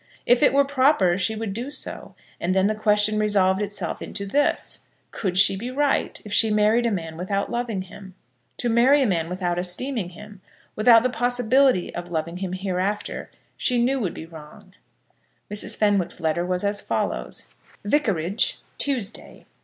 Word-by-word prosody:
If 245 Hz, 0 st, +4 dB
it 295 Hz, -, +5 dB
were 280 Hz, +1 st, +4 dB
proper, 265 Hz, -, +3 dB
she 210 Hz, +4 st, 0 dB
would 215 Hz, -2 st, -4 dB
do 240 Hz, +6 st, -4 dB
so; 290 Hz, -, -7 dB, 0.2 s
and 185 Hz, +2 st, -1 dB
then 190 Hz, 0 st, +3 dB
the 215 Hz, -, +2 dB
question 215 Hz, 0 st, +2 dB
resolved 200 Hz, -2 st, +2 dB
itself 205 Hz, 0 st, -3 dB
into 200 Hz, -, -5 dB
this; 285 Hz, +9 st, 0 dB, 0.3 s
Could 185 Hz, -3 st, -3 dB
she 195 Hz, 0 st, +6 dB
be 230 Hz, +6 st, -5 dB
right 280 Hz, +2 st, 0 dB
if 210 Hz, -, -6 dB
she 220 Hz, +1 st, +4 dB
married 215 Hz, +3 st, +3 dB
a -, -, 0 dB
man 165 Hz, -5 st, -4 dB
without 195 Hz, +3 st, -2 dB
loving 235 Hz, -5 st, -2 dB
him? 190 Hz, 0 st, -13 dB, 0.4 s
To 245 Hz, -, -1 dB
marry 255 Hz, +5 st, +4 dB
a -, -, +2 dB
man 170 Hz, -6 st, 0 dB
without 175 Hz, -1 st, -2 dB
esteeming 185 Hz, +3 st, -2 dB
him, 210 Hz, +1 st, -13 dB, 0.3 s
without 230 Hz, +1 st, +6 dB
the 255 Hz, -, +1 dB
possibility 245 Hz, -2 st, +2 dB
of 175 Hz, 0 st, -6 dB
loving 170 Hz, +1 st, -3 dB
him 185 Hz, -1 st, -4 dB
hereafter, 190 Hz, +2 st, -3 dB, 0.3 s
she 250 Hz, -, 0 dB
knew 260 Hz, +3 st, +1 dB
would 190 Hz, -8 st, -3 dB
be -, -, -7 dB
wrong. 155 Hz, -2 st, -14 dB, 0.8 s
Mrs. 210 Hz, +1 st, -2 dB
Fenwick's 205 Hz, -5 st, +1 dB
letter 170 Hz, +1 st, -1 dB
was 180 Hz, +1 st, 0 dB
as 200 Hz, 0 st, 0 dB
follows; -, -, -3 dB, 0.3 s
Vicarage, 205 Hz, -, +1 dB, 0.2 s
Tuesday. 245 Hz, -7 st, -2 dB
205 Hz, 170 wpm, -23 LUFS, 185-240 Hz, 0.8 s, she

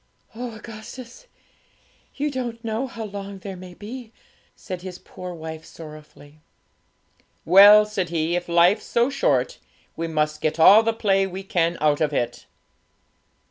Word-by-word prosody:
'Oh, 235 Hz, 0 st, -6 dB
Augustus! 235 Hz, -, -11 dB, 0.9 s
you 295 Hz, +1 st, -2 dB
don't 240 Hz, -3 st, -5 dB
know 225 Hz, +4 st, -2 dB
how 230 Hz, -2 st, -7 dB
long 200 Hz, -1 st, -7 dB
there 190 Hz, 0 st, -8 dB
may 180 Hz, -1 st, -11 dB
be,' 225 Hz, +3 st, -9 dB, 0.4 s
said 185 Hz, -2 st, -7 dB
his 180 Hz, -1 st, -8 dB
poor 180 Hz, -1 st, -9 dB
wife 160 Hz, -1 st, -8 dB
sorrowfully. 155 Hz, -2 st, -13 dB, 1.1 s
'Well,' 205 Hz, +4 st, +8 dB
said 195 Hz, -5 st, -3 dB
he, 165 Hz, 0 st, -1 dB
'if 175 Hz, 0 st, -3 dB
life's 175 Hz, +4 st, +4 dB
so 240 Hz, +3 st, +1 dB
short, -, -, 0 dB, 0.4 s
we 165 Hz, -, -3 dB
must 155 Hz, -1 st, -1 dB
get 155 Hz, +1 st, -1 dB
all 200 Hz, +7 st, +8 dB
the 225 Hz, 0 st, +1 dB
play 195 Hz, -3 st, +1 dB
we 190 Hz, +1 st, -7 dB
can 170 Hz, -3 st, 0 dB
out 150 Hz, 0 st, +2 dB
of 150 Hz, -1 st, +1 dB
it.' 120 Hz, -3 st, -3 dB
190 Hz, 145 wpm, -23 LUFS, 165-225 Hz, 1.1 s, Well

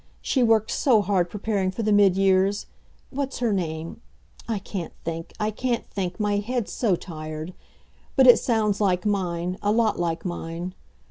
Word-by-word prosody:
She 265 Hz, -, 0 dB
worked 225 Hz, -2 st, +3 dB
so 230 Hz, -7 st, +3 dB
hard 185 Hz, -3 st, +1 dB
preparing 205 Hz, -2 st, -1 dB
for 190 Hz, +5 st, -4 dB
the 215 Hz, -, +1 dB
mid 200 Hz, -2 st, +5 dB
years. 195 Hz, +1 st, +2 dB, 0.5 s
What's 275 Hz, 0 st, -3 dB
her 235 Hz, -4 st, +1 dB
name? 165 Hz, 0 st, -3 dB, 0.5 s
I 225 Hz, -, 0 dB
can't 190 Hz, -3 st, -6 dB
think 165 Hz, 0 st, -4 dB
I 215 Hz, 0 st, 0 dB
can't 240 Hz, +2 st, -2 dB
think, 185 Hz, -1 st, -4 dB
my 205 Hz, -1 st, +1 dB
head's 235 Hz, +2 st, -2 dB
so 215 Hz, -7 st, +2 dB
tired. 155 Hz, -1 st, -7 dB, 0.6 s
But 265 Hz, -, +6 dB
it 245 Hz, -, +8 dB
sounds 215 Hz, -4 st, +1 dB
like 185 Hz, -1 st, +1 dB
mine, 180 Hz, -3 st, -1 dB
a 205 Hz, -, +1 dB
lot 220 Hz, -2 st, +2 dB
like 165 Hz, 0 st, -2 dB
mine. 175 Hz, 0 st, -4 dB
200 Hz, 170 wpm, -25 LUFS, 175-220 Hz, 0.6 s, it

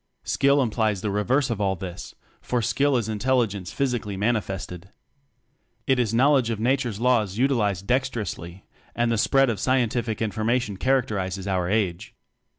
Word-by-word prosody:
Skill 140 Hz, 0 st, +3 dB
implies 110 Hz, -4 st, 0 dB
the 105 Hz, -, -2 dB
reverse 125 Hz, +7 st, +1 dB
of 110 Hz, -3 st, -2 dB
all 95 Hz, -1 st, +1 dB
this, 90 Hz, -1 st, -8 dB, 0.3 s
for 125 Hz, -, -1 dB
skill 135 Hz, +4 st, +1 dB
is 115 Hz, -3 st, -2 dB
intelligence 110 Hz, -4 st, 0 dB
physically 120 Hz, -7 st, -2 dB
manifested. 95 Hz, -4 st, -2 dB, 1.0 s
It 130 Hz, -1 st, +2 dB
is 115 Hz, -4 st, +1 dB
knowledge 130 Hz, +1 st, +3 dB
of 115 Hz, -2 st, -2 dB
Na 125 Hz, +4 st, +3 dB
ture's 120 Hz, -6 st, -4 dB
Laws 115 Hz, -5 st, +1 dB
utilized 110 Hz, -8 st, +1 dB
dexterously 110 Hz, -8 st, -2 dB, 0.3 s
and 120 Hz, 0 st, +1 dB
the 115 Hz, -, +1 dB
spread 135 Hz, +1 st, +3 dB
of 110 Hz, -, -4 dB
scientific 120 Hz, -3 st, 0 dB
information 110 Hz, -1 st, -1 dB
characterizes 100 Hz, -7 st, -1 dB
our 90 Hz, -2 st, 0 dB
age. 95 Hz, -5 st, -1 dB
110 Hz, 150 wpm, -24 LUFS, 100-125 Hz, 1.0 s, Skill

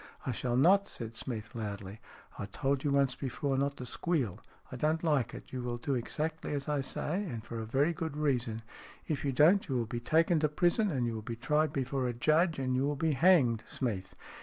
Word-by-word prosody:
" -, -, -22 dB
I 130 Hz, -, 0 dB
shall 120 Hz, +1 st, -1 dB
not," 195 Hz, +8 st, +5 dB
said 115 Hz, -1 st, -6 dB
Smeath, 110 Hz, -2 st, -5 dB
loudly. 100 Hz, -2 st, -5 dB, 0.2 s
" -, -, -20 dB
I 100 Hz, -, -3 dB
told 135 Hz, +7 st, -1 dB
you 145 Hz, -, +1 dB
once 140 Hz, -2 st, +3 dB
before 135 Hz, +1 st, -2 dB
not 140 Hz, +1 st, 0 dB
to 125 Hz, -, -6 dB
squeal. 135 Hz, -, -1 dB, 0.3 s
I -, -, -5 dB
don't 155 Hz, +5 st, 0 dB
like 150 Hz, -8 st, +1 dB
it. -, -, -11 dB
You 130 Hz, -, -3 dB
will 120 Hz, -1 st, -3 dB
do 135 Hz, +4 st, -2 dB
exactly 155 Hz, +5 st, -2 dB
as 140 Hz, -1 st, -4 dB
I 150 Hz, -2 st, +1 dB
say, 170 Hz, +7 st, -2 dB
and 120 Hz, -, -5 dB
for 115 Hz, -, -5 dB
a 110 Hz, -, -5 dB
very 140 Hz, +8 st, +2 dB
good 160 Hz, -2 st, -4 dB
reason. 120 Hz, -7 st, 0 dB, 0.4 s
If 150 Hz, -3 st, -2 dB
you 140 Hz, -, +1 dB
don't 165 Hz, +8 st, +4 dB
you 135 Hz, -, 0 dB
will 120 Hz, -2 st, +1 dB
be 120 Hz, +2 st, -4 dB
taken 160 Hz, +6 st, +3 dB
to 150 Hz, 0 st, +2 dB
prison, 175 Hz, +7 st, +2 dB
and 130 Hz, -7 st, 0 dB
you 115 Hz, -, -1 dB
will 110 Hz, -, -4 dB
be 115 Hz, +2 st, -5 dB
tried 150 Hz, +5 st, +1 dB
before 135 Hz, -2 st, -1 dB
a 120 Hz, -, -1 dB
judge, 155 Hz, +7 st, +2 dB
and 130 Hz, -1 st, 0 dB
you 130 Hz, -, +2 dB
will 145 Hz, +1 st, 0 dB
be 160 Hz, +2 st, +1 dB
hanged, 135 Hz, -8 st, +4 dB
Smeath. 100 Hz, -7 st, -3 dB
135 Hz, 235 wpm, -31 LUFS, 120-155 Hz, 0.4 s, not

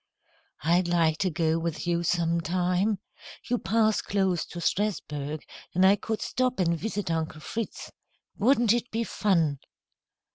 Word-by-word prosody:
"I'd 175 Hz, +3 st, +3 dB
like 165 Hz, -2 st, +2 dB
to 190 Hz, -, +2 dB
go 160 Hz, 0 st, +1 dB
with 165 Hz, 0 st, -3 dB
you 170 Hz, 0 st, +1 dB
sometime. 175 Hz, +4 st, +1 dB, 0.5 s
You 245 Hz, -1 st, +1 dB
pass 220 Hz, 0 st, +2 dB
close 190 Hz, -4 st, 0 dB
to 175 Hz, -, -8 dB
Strasburg, 155 Hz, -7 st, -2 dB, 0.3 s
and 185 Hz, +1 st, +5 dB
I 195 Hz, +1 st, +7 dB
could 220 Hz, +1 st, -3 dB
stop 255 Hz, -2 st, 0 dB
and 170 Hz, -2 st, +2 dB
visit 205 Hz, 0 st, -3 dB
Uncle 160 Hz, -1 st, -2 dB
Fritz. 225 Hz, +6 st, -5 dB, 0.4 s
Wouldn't 235 Hz, 0 st, +4 dB
it 240 Hz, +1 st, -1 dB
be 230 Hz, +1 st, -1 dB
fun!" 165 Hz, -11 st, +1 dB
180 Hz, 140 wpm, -27 LUFS, 165-215 Hz, 0.5 s, I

